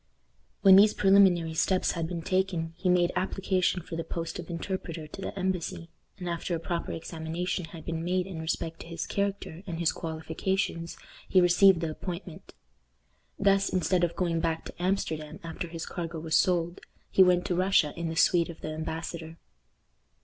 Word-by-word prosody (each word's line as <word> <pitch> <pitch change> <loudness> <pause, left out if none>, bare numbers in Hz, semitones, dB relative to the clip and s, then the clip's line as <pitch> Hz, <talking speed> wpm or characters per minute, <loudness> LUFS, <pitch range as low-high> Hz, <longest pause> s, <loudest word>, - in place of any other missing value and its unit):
When 190 -1 +9
these 210 +2 +6
preliminary 190 -5 +5
steps 185 +3 +2
had 165 -2 -2
been 170 -1 -5
taken, 185 -3 0
he 180 - -1
made 175 -1 +4
application 185 -1 0
for 165 - -7
the 165 - -2
post 165 +1 -5
of 175 - -8
interpreter 170 -2 -4
to 155 +5 -10
the 195 - -5
embassy; 180 -2 -2 0.3
and 180 - -6
after 170 0 -2
a - - -3
proper 170 0 -3
examination 165 +2 -3
had 160 -1 -11
been 165 -1 -3
made 180 +1 0
in 180 -4 -6
respect 160 0 -3
to - - -9
his 170 0 -4
character 200 -4 -2
and 170 -3 -4
his 170 -1 +2
qualifications, 165 +2 -3 0.3
he 185 - +5
received 180 0 +6
the 165 -2 -1
appointment. 175 +1 -7 0.8
Thus, 195 0 +3
instead 180 0 +1
of 170 -1 0
going 170 -3 0
back 165 -1 -1
to - - -9
Amsterdam 160 -5 -2
after 165 +1 -5
his 165 0 -6
cargo 170 -2 -5
was 160 0 -1
sold, 175 -1 +2 0.3
he - - +5
went 180 -1 +5
to 180 - 0
Russia 185 -5 +3
in 170 0 -3
the 160 - -4
suite 170 0 +4
of 165 - -9
the - - -4
embassador. 160 +1 -5
170 Hz, 180 wpm, -28 LUFS, 165-185 Hz, 0.8 s, When